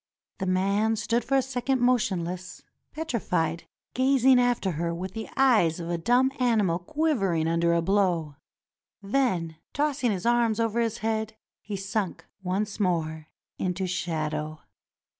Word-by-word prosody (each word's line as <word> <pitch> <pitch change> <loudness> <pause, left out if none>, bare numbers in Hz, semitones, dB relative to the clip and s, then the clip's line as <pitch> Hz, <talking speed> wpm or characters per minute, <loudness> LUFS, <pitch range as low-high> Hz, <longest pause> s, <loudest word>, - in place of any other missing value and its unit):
The 190 - -2
man 200 +4 +2
stood 225 +2 0
for 275 +3 +1
a 265 - +2
second 265 0 -1
motionless, 185 -7 0 0.3
petrified, 180 - -2 0.3
gazing 260 0 +4
after 245 -6 +1
her 170 +1 -2
with 185 +2 -5
the 225 -1 -6
eyes 215 -12 +4
of 170 0 -4
a 170 - 0
dumb 245 +8 +3
animal 215 -9 +2
quivering 195 - 0
under 170 +1 +2
a 170 - +1
blow. 175 -6 +1 0.7
Then, 195 -8 0 0.2
tossing 285 -3 0
his 185 -1 -3
arms 235 -2 +2
above 225 -2 +1
his 230 -1 0
head, 220 0 -1 0.3
he 210 - -5
slunk 195 0 -3 0.2
once 195 +4 -2
more 160 -5 -1 0.3
into 185 +1 -1
shadow. 155 -4 -3
200 Hz, 140 wpm, -27 LUFS, 170-240 Hz, 0.7 s, gazing